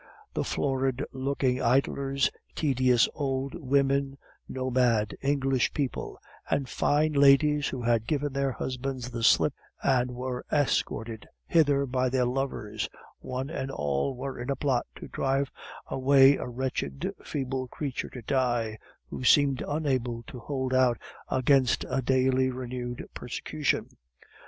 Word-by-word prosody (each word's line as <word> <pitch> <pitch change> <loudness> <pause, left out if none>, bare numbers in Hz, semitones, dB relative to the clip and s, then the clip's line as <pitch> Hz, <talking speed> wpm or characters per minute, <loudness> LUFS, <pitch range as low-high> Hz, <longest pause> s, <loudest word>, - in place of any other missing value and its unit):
The - - -1
florid 135 -1 -1
looking 130 -1 0
idlers, 135 +2 +1 0.2
tedious 130 -5 +3
old 135 -2 -2
women, 140 -2 +1 0.3
nomad 125 -5 +1
English 135 -2 +1
people, 140 -4 -3 0.3
and 135 -2 0
fine 150 +4 +1
ladies 145 +1 +5
who 130 -3 -4
had 115 -1 +1
given 145 -2 -1
their 140 -1 0
husbands 130 0 -4
the 120 -1 -4
slip, 115 - +4 0.3
and 125 -2 +2
were 125 0 -4
escorted 115 -6 0 0.2
hither 145 -4 +3
by 130 0 0
their 125 0 +1
lovers 120 -5 -2 0.3
one 130 +3 -4
and 135 -5 -3
all 75 - -1
were 135 +1 -5
in 125 +2 -5
a 140 - +1
plot 135 -4 0
to - - -9
drive 135 +1 0 0.3
away 135 +1 +5
a - - -5
wretched, 125 - -3
feeble 130 -2 -3
creature 135 +1 -4
to 125 -3 -9
die, 120 -4 0 0.3
who - - -5
seemed 140 0 +4
unable 130 -6 -1
to 125 - -10
hold 130 +1 -3
out 130 -2 +4 0.3
against 130 -1 +3
a 135 - 0
daily 130 0 +2
renewed 125 -1 -5
persecution! 145 +4 -2
130 Hz, 130 wpm, -28 LUFS, 125-140 Hz, 0.3 s, ladies